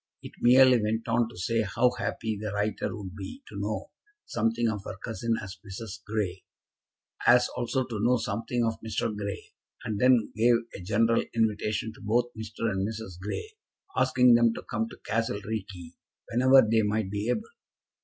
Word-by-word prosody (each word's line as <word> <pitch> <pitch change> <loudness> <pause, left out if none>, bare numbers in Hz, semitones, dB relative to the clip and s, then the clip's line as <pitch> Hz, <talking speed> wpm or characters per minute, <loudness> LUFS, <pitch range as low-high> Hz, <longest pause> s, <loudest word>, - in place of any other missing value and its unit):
It - - -8
merely 125 0 +6
went 110 +2 -1
on 115 0 +2
to 120 - -13
say 115 +5 0
how 115 +4 +2
happy 115 -2 -3
the 105 0 -4
writer 105 0 -1
would 95 -2 -8
be 105 - -8
to - - -7
know - - -3 0.3
something 115 +1 0
of 105 -3 -2
her 95 - -7
cousin 115 +2 -2
as 95 0 -8
Mrs. 105 +1 -8
Grey, 100 -4 -2 0.8
as 125 0 +6
also 125 +2 -1
to 115 -4 -5
know 120 +4 +3
something 115 +2 -1
of 115 0 -2
Mr. 110 0 -2
Grey, 100 -1 -6 0.3
and 105 -2 -3
then 125 -2 +4
gave 120 +2 +5 0.2
a - - -7
general 115 +5 +2
invitation 110 0 0
to - - -16
both 120 +3 +1
Mr. 110 +1 -4
and 95 +1 -1
Mrs. 110 -5 -7
Grey, 105 - -5 0.4
asking 130 -1 +5
them 115 -1 +4
to - - -7
come 115 0 -2
to - - -12
Castle 115 -1 -1
Reekie 95 -6 -5 0.4
whenever 130 0 +6
they 110 0 +3
might 105 -1 -1
be 105 +3 -2
able. 120 -3 -1
110 Hz, 175 wpm, -28 LUFS, 105-120 Hz, 0.8 s, merely